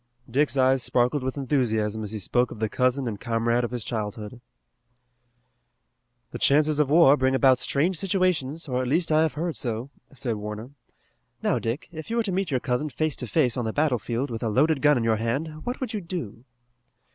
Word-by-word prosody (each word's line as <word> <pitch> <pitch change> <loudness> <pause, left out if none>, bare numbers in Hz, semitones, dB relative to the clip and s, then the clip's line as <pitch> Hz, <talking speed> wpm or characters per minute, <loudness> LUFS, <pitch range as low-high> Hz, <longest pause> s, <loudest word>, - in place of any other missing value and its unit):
Dick's 140 +3 +1
eyes 130 0 +4
sparkled 125 +4 +1
with 130 +2 -3
enthusiasm 110 -6 0
as 105 - -5
he 110 - -5
spoke 120 +5 0
of 120 - -9
the 110 - 0
cousin 130 +2 +1
and 105 -3 -4
comrade 115 0 0
of 120 - -1
his 120 -3 -4
childhood. 110 +1 -5 1.9
"The - - -6
chances 150 +1 +3
of 150 -2 +2
war 150 -2 +6
bring 130 -1 +1
about 130 -1 +4
strange 165 +6 +1
situations, 175 -6 0
or 125 -1 -1
at 130 - -2
least 165 +5 +1
I 155 0 +4
have 160 -1 +1
heard 165 +2 -3
so," 120 +1 -4 0.2
said 125 -5 -3
Warner. 105 +4 -6 0.7
"Now, - - +1
Dick, 115 +6 -3
if 160 +2 -8
you 230 - -2
were 235 - +2
to 205 - -2
meet 190 +1 -1
your 130 -4 +1
cousin 125 +5 -1
face 155 0 -1
to 125 - -4
face 130 -2 +2
on 125 - -2
the 110 - -1
battlefield 130 -3 0
with 115 - -4
a 115 - -1
loaded 140 +5 +2
gun 150 -2 +5
in 120 - -1
your 115 -1 +2
hand 145 +8 -3
what 245 - -2
would 250 -3 -4
you 210 - -2
do?" 165 - -6
130 Hz, 205 wpm, -25 LUFS, 115-155 Hz, 1.9 s, war